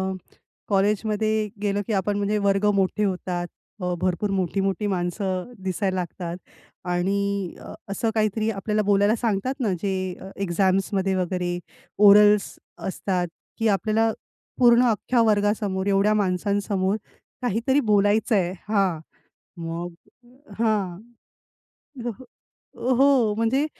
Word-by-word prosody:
अ, 185 Hz, -, -17 dB, 0.3 s
कॉलेजमध्ये 215 Hz, +1 st, +1 dB
गेलो 205 Hz, 0 st, 0 dB
की 225 Hz, -, -1 dB
आपण 200 Hz, +1 st, 0 dB
म्हणजे 205 Hz, +1 st, 0 dB
वर्ग 195 Hz, +1 st, +2 dB
मोठे 195 Hz, +2 st, +1 dB
होतात. 180 Hz, -2 st, -2 dB, 0.3 s
अ, 180 Hz, 0 st, -1 dB
भरपूर 185 Hz, +2 st, 0 dB
मोठी-मोठी 195 Hz, +2 st, 0 dB
माणसं 185 Hz, +2 st, -2 dB, 0.2 s
दिसायला 190 Hz, +1 st, -1 dB
लागतात 175 Hz, -1 st, -4 dB, 0.6 s
आणि 200 Hz, +1 st, -1 dB
अ, -, -, -9 dB, 0.2 s
असं 200 Hz, +3 st, -1 dB
काहीतरी 215 Hz, 0 st, +1 dB
आपल्याला 210 Hz, +1 st, -1 dB
बोलायला 205 Hz, +2 st, +4 dB
सांगतात 235 Hz, +5 st, -1 dB
ना 220 Hz, -7 st, +1 dB
जे 195 Hz, -1 st, 0 dB, 0.3 s
अ, 190 Hz, -, -8 dB
एक्झाम्समध्ये 190 Hz, +1 st, +1 dB
वगैरे 180 Hz, -1 st, -1 dB, 0.5 s
ओरल्स 205 Hz, 0 st, +6 dB, 0.3 s
असतात 185 Hz, -1 st, -1 dB, 0.3 s
की 225 Hz, -, +2 dB
आपल्याला 215 Hz, +2 st, +2 dB, 0.5 s
पूर्ण 240 Hz, -1 st, +6 dB
अख्ख्या 230 Hz, +2 st, +1 dB
वर्गासमोर 205 Hz, -2 st, +1 dB
एवढ्या 200 Hz, +1 st, +3 dB
माणसांसमोर 200 Hz, 0 st, 0 dB, 0.5 s
काहीतरी 245 Hz, +4 st, +1 dB
बोलायचंय 205 Hz, -2 st, +3 dB, 0.2 s
हां, 195 Hz, -6 st, +1 dB, 0.6 s
मग 170 Hz, +1 st, -5 dB, 0.7 s
हां. 205 Hz, -6 st, 0 dB, 1.0 s
जसं, 240 Hz, +1 st, -5 dB, 0.6 s
अ, 260 Hz, -, +4 dB
हो 260 Hz, -5 st, +4 dB
म्हणजे 230 Hz, +6 st, +1 dB
200 Hz, 115 wpm, -24 LUFS, 185-215 Hz, 1.0 s, ओरल्स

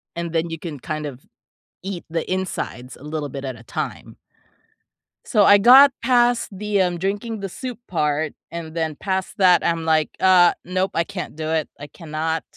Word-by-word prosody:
and 170 Hz, -1 st, -4 dB
then, 165 Hz, +1 st, 0 dB
you 165 Hz, -1 st, -6 dB
can 155 Hz, -4 st, -6 dB
kind 155 Hz, +3 st, -4 dB
of 135 Hz, -3 st, -8 dB, 0.6 s
eat 190 Hz, -3 st, -5 dB
the 165 Hz, 0 st, -2 dB
insides 135 Hz, -9 st, -4 dB
a -, -, -16 dB
little 150 Hz, -1 st, -4 dB
bit 140 Hz, 0 st, -6 dB
at 130 Hz, -2 st, -4 dB
a 110 Hz, -, -14 dB
time 105 Hz, -, -6 dB, 1.1 s
so, 210 Hz, -, +3 dB
I 205 Hz, 0 st, +7 dB
got 265 Hz, +6 st, +8 dB
past 245 Hz, -1 st, +3 dB
the, 205 Hz, 0 st, -1 dB
um, 180 Hz, -1 st, 0 dB
drinking 205 Hz, +4 st, -3 dB
the 195 Hz, -, -4 dB
soup 250 Hz, +4 st, -6 dB
part, 150 Hz, -2 st, -1 dB, 0.2 s
and 165 Hz, -1 st, -7 dB
then 160 Hz, -2 st, -2 dB
past 190 Hz, +1 st, -3 dB
that 185 Hz, -2 st, +5 dB
I'm 165 Hz, -1 st, 0 dB
like, 155 Hz, -1 st, +2 dB
"Uh, 180 Hz, -2 st, +6 dB
nope. 185 Hz, +2 st, -1 dB
I 165 Hz, -, +2 dB
can't 150 Hz, -, -7 dB
do 155 Hz, 0 st, -4 dB
it. 160 Hz, -2 st, 0 dB
I 145 Hz, -, -8 dB
cannot." 160 Hz, +1 st, -3 dB
170 Hz, 185 wpm, -22 LUFS, 155-195 Hz, 1.1 s, got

